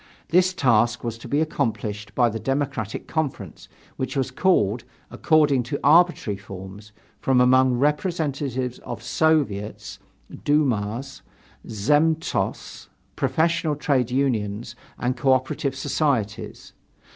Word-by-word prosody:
This 180 +2 +4
task 120 -4 +2
was 115 -2 -3
to 120 - -10
be 145 +5 +1
accomplished 105 -8 -3
by 120 - +4
the 110 0 -4
Democratic 135 -6 -3
Conference, 135 - -4 0.3
which 130 +1 -3
was 130 -1 -1
called, 120 - +2 0.3
according 150 -5 +3
to 140 - -2
arbitrary 155 - +4
forms, 95 +2 -10 0.3
from 130 -1 +2
among 130 +1 +5
representatives 145 - -1
of 120 -2 -8
Soviets, 120 -7 0 0.4
dumas, 135 -3 0 0.5
zemstvos, 150 +9 0 0.3
professional 160 -1 +1
trade 135 -4 0
unions 120 -5 -1 0.2
and 125 +1 -1
co 130 +1 +3
operative 130 +1 -1
societies. 130 -7 -2
130 Hz, 110 wpm, -23 LUFS, 110-150 Hz, 0.5 s, among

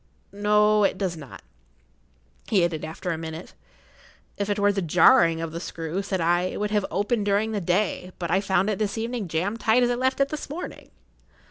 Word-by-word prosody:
"No, 210 +1 +3
it 195 - +1
does 185 -3 -2
not," 145 -5 -11 1.0
he 190 -5 +3
added, 160 -3 -3
after 160 +3 -4
a 160 - -3
minute. 160 +1 -7 0.8
"If 200 0 -3
it 205 - 0
were 205 0 +3
the 200 -1 -2
jarring 165 -1 +4
of 165 -1 -4
the 165 - -5
screw," 165 +1 -4
said 195 -1 -3
I, 175 +1 +2
"it 185 - -4
would 210 0 -2
have[Pg 210 -2 +1
63] - - -8
opened 205 +1 0
during 205 +2 +1
the 210 -2 -2
day; 185 +1 -1
but 170 -2 -4
I 190 +2 +3
found 195 +1 +1
it 200 - -3
this 210 0 -1
evening 230 -2 -3
jammed 185 +8 -2
tight 230 +2 +3
as 245 - +2
I - - +2
left 260 +2 0
it 275 0 +2
this 305 -2 -6
morning." 325 +5 -7
200 Hz, 215 wpm, -25 LUFS, 170-215 Hz, 1.0 s, jarring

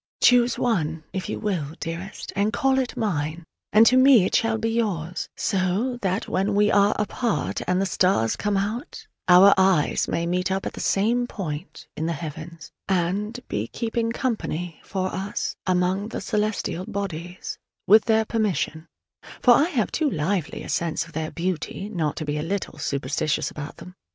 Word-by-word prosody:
Choose 245 -1 +5
one, 165 -10 0
if 190 - -4
you - - -3
will, 170 -8 -2
dearest, 170 +4 -6
and 200 +2 +1
call 265 +3 +2
it 255 -2 -3
mine: 165 -5 -2 0.3
and 215 +2 +7
to 250 - +5
me 255 -6 +7
it - - -2
shall 225 0 +2
be 225 +1 -1
yours: 185 -7 -2
so 200 +6 0
that 190 +1 -1
when 200 +2 0
we 210 +1 +4
are 200 +1 +4
apart 225 +2 -1
and 180 +1 +2
the 195 - +1
stars 180 -12 +2
come 205 -1 0
out, 225 - -4 0.2
our 185 +2 +8
eyes 190 -6 +3
may 170 - -1
meet 180 +2 0
up 190 0 -1
at - - -3
the - - -8
same 235 +5 +1
point 170 -6 -6
in 160 - -2
the 170 - 0
heavens, 160 +1 -8 0.2
and 195 +6 -1
be 105 +2 -2
"keeping 230 - -2
company" 180 - -3
for 185 -1 -3
us 195 +2 -3
among 185 +2 +1
the - - -5
celestial 210 -4 -2
bodies 180 -2 -5 0.3
with 215 +2 +6
their 220 -1 +3
permission: 185 -8 -1 0.5
for 245 - +6
I 285 - +5
have 245 - 0
too 315 -2 +1
lively 170 - -2
a - - -9
sense 170 -1 -1
of 165 - -16
their 155 0 -3
beauty 185 +3 -3
not 160 -8 -1
to 155 - -4
be 150 0 -2
a - - -1
little 190 +5 -3
superstitious 140 +1 -1
about 145 -1 -7
them. 180 +2 -11
190 Hz, 175 wpm, -24 LUFS, 170-220 Hz, 0.5 s, our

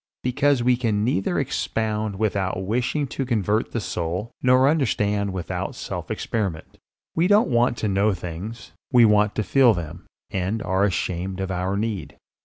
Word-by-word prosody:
Because 135 0 +2
we 125 0 +3
can 110 -4 0
neither 105 -5 0
expound 110 -2 -1
without 95 -3 -1
wishing 125 +7 0
to 135 - -3
convert 110 -3 0
the 115 - -1
soul, 90 +3 -3
nor 130 +1 +5
understand 105 -9 +1
without 95 -2 -4
self - - -6
experiment. 95 -8 -3 0.3
We 170 +2 +2
don't 205 +3 +4
want 120 0 +2
to 110 - -1
know 100 +2 +2
things, 95 +7 -7 0.2
we 120 -3 +7
want 105 -1 +3
to 110 - 0
feel 125 -1 +4
them 85 0 -7 0.2
and 95 +4 -2
are 95 +2 +2
ashamed 95 0 -2
of 95 0 -2
our 95 +2 -1
need. 105 -5 -3
105 Hz, 160 wpm, -23 LUFS, 95-120 Hz, 0.3 s, we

